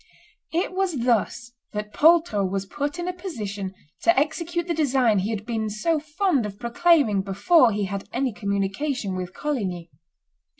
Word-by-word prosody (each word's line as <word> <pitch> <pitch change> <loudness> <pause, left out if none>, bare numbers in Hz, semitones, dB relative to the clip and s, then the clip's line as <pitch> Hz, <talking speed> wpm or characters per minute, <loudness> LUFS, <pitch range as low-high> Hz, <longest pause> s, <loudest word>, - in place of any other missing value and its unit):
It 345 +3 0
was 370 -8 -1
thus 240 0 0 0.2
that 210 0 -5
Poltrot 315 - +4
was 195 0 -2
put 290 - -3
in 350 0 -3
a 365 - -1
position 210 - -5 0.3
to 340 -5 +4
execute 335 +3 -1
the 345 - -1
design 260 -9 +2
he 195 +3 -1
had 215 -2 -3
been 220 -2 -2
so 305 +10 0
fond 310 - 0
of 200 -1 -9
proclaiming 240 - +3
before 205 - +4
he 205 0 -1
had 195 +1 -5
any 255 -1 -1
communication 200 +3 -2
with 180 0 -5
Coligny. 190 - -3
240 Hz, 160 wpm, -24 LUFS, 200-320 Hz, 0.3 s, Poltrot